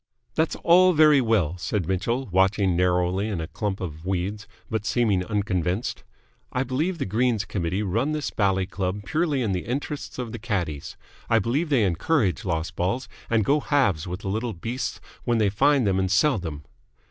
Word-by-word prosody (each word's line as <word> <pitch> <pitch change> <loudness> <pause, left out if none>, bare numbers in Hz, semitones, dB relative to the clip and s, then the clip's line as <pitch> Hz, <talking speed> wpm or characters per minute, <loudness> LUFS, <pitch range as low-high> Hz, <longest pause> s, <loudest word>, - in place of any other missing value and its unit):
"That's 160 0 0
all 180 +2 +6
very 150 -3 +6
well," 95 -8 +1
said 90 0 -2
Mitchell, 115 +8 -1
watching 95 0 +3
narrowly 90 +2 +1
in 100 -5 -2
a 80 - -3
clump 100 +3 -3
of 80 -3 -6
weeds 95 +3 -2 0.2
but 110 -2 -2
seeming 105 -3 +1
unconvinced. 100 -1 -1 0.5
"I 125 - 0
believe 150 +8 -1
the 145 - -2
Greens 110 +1 +1
Committee 95 +2 -2
run 115 +10 0
this 150 -1 -2
bally 95 -2 +1
club 95 +1 -3
purely 150 - 0
in 110 - 0
the 90 -1 -3
interests 140 +4 -4
of 125 -3 -4
the - - -6
caddies. 90 - -3 0.3
I 115 - +4
believe 130 - 0
they 130 -7 +3
encourage 100 - +1
lost 85 -2 -2
balls, 100 +8 -1 0.2
and 115 -3 +2
go 145 +2 +3
halves 130 - +1
with 90 +1 -5
the 95 - -4
little 110 +3 -2
beasts 115 +9 -4 0.2
when 120 -1 +1
they 105 -2 +3
find 130 +6 +3
them 95 -1 +2
and 95 -1 0
sell 110 +6 +3
them!" 80 -5 -6
105 Hz, 180 wpm, -25 LUFS, 90-125 Hz, 0.5 s, all